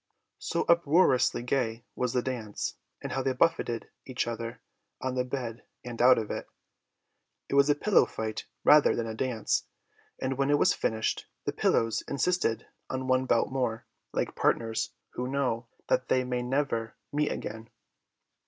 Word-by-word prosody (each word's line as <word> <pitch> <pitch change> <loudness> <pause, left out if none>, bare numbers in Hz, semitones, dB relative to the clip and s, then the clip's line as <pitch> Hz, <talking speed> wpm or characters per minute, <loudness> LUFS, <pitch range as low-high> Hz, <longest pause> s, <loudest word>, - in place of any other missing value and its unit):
So - - -1
uproariously 165 -7 +4
gay 120 -3 -1
was 125 -2 -1
the 125 - +1
dance, 115 -6 -3 0.3
and - - -4
how 135 - 0
they 130 0 0
buffeted 120 -4 +1
each 130 -1 -2
other 115 0 -5 0.4
on 130 -1 -2
the 125 0 +1
bed 125 -3 -4 0.2
and 120 -1 -4
out 125 +1 +7
of 110 -2 -2
it! - - -4 1.0
It - - -4
was 140 +1 +5
a 145 - +5
pillow 205 +7 +4
fight 110 -1 -4 0.2
rather 150 0 +6
than 115 - -1
a 110 - -4
dance, 115 -2 -1 0.5
and 130 0 -2
when 135 0 +2
it 145 - +5
was - - +4
finished, 110 0 -1 0.2
the - - -1
pillows 115 -1 +2
insisted 140 -6 0 0.2
on 130 0 -3
one 130 0 +2
bout 115 - +2
more, 125 -4 -1 0.3
like - - -1
partners 115 -1 +1 0.2
who 125 - -3
know 130 -4 -1 0.2
that 130 - +1
they 130 - +2
may 125 -1 -2
never 125 -3 -1 0.2
meet 150 0 +1
again. 110 +1 -6
125 Hz, 160 wpm, -29 LUFS, 115-135 Hz, 1.0 s, out